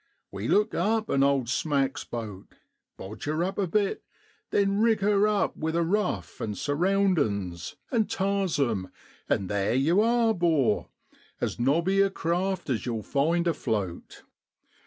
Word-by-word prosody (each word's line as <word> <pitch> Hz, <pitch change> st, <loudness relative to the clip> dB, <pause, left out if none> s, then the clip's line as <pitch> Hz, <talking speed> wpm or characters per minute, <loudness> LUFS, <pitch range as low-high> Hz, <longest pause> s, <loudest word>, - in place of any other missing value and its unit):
We -, -, -4 dB
look 210 Hz, +2 st, +2 dB
up 215 Hz, +4 st, 0 dB
an 135 Hz, -, +2 dB
owd 140 Hz, -3 st, +2 dB
smack's 135 Hz, +1 st, 0 dB
boat, 110 Hz, -5 st, -7 dB, 0.4 s
bodge 105 Hz, +3 st, -8 dB
her 155 Hz, +3 st, 0 dB
up 190 Hz, +3 st, -3 dB
a 195 Hz, -, +1 dB
bit, 200 Hz, +3 st, 0 dB, 0.5 s
then 200 Hz, 0 st, +1 dB
rig 220 Hz, -2 st, +3 dB
her 205 Hz, +1 st, +3 dB
up 210 Hz, -1 st, 0 dB
with 160 Hz, +1 st, -2 dB
a 170 Hz, -, +2 dB
ruf, 200 Hz, +3 st, -1 dB
an' 105 Hz, -2 st, -3 dB
surroundin's, 145 Hz, -, 0 dB, 0.2 s
an' 225 Hz, -4 st, +2 dB
tars 195 Hz, -4 st, 0 dB
'em 110 Hz, -9 st, 0 dB, 0.4 s
an' 95 Hz, -, +1 dB
theer 100 Hz, +2 st, 0 dB
yow 155 Hz, +10 st, +3 dB
are, 230 Hz, 0 st, +3 dB
'bor 160 Hz, -, +1 dB, 0.5 s
as -, -, -3 dB
nobby 170 Hz, +10 st, +2 dB
a 195 Hz, -, +4 dB
craft 185 Hz, +1 st, -2 dB
as 125 Hz, 0 st, -2 dB
yow'll 115 Hz, -3 st, -2 dB
find 165 Hz, +5 st, +1 dB
afloat. 105 Hz, -, -3 dB
165 Hz, 150 wpm, -27 LUFS, 120-195 Hz, 0.5 s, a